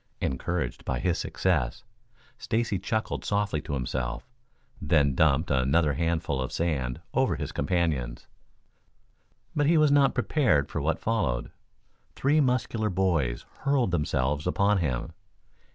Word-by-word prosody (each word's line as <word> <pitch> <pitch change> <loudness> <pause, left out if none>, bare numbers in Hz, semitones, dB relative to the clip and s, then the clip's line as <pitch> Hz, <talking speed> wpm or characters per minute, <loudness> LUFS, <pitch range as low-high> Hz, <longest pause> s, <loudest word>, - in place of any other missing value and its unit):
Encouraged 85 +6 -2
by - - -2
his 90 -2 0
success, 80 -10 -1 0.6
Stacy 110 -4 -1
chuckled 110 +1 -2
softly 100 -7 0
to 70 - -4
himself, 65 -2 -3 0.5
then 75 -3 +3
dumped 80 +3 +2
another 70 +4 +2
handful 80 -3 -1
of 65 - -3
sand 65 -8 -2
over - - +2
his - - -4
companions. 75 -10 -1 1.3
But 145 -1 +2
he 165 +1 +4
was 155 -2 +4
not 140 -1 +4
prepared 120 - +2
for 80 - -2
what 80 +3 0
followed. 100 - -1 0.6
Three 145 +3 +2
muscular 125 -4 0
boys 85 -10 0
hurled 135 -7 +1
themselves 75 -2 0
upon 100 +2 +2
him. 65 -8 -2
85 Hz, 125 wpm, -27 LUFS, 70-105 Hz, 1.3 s, he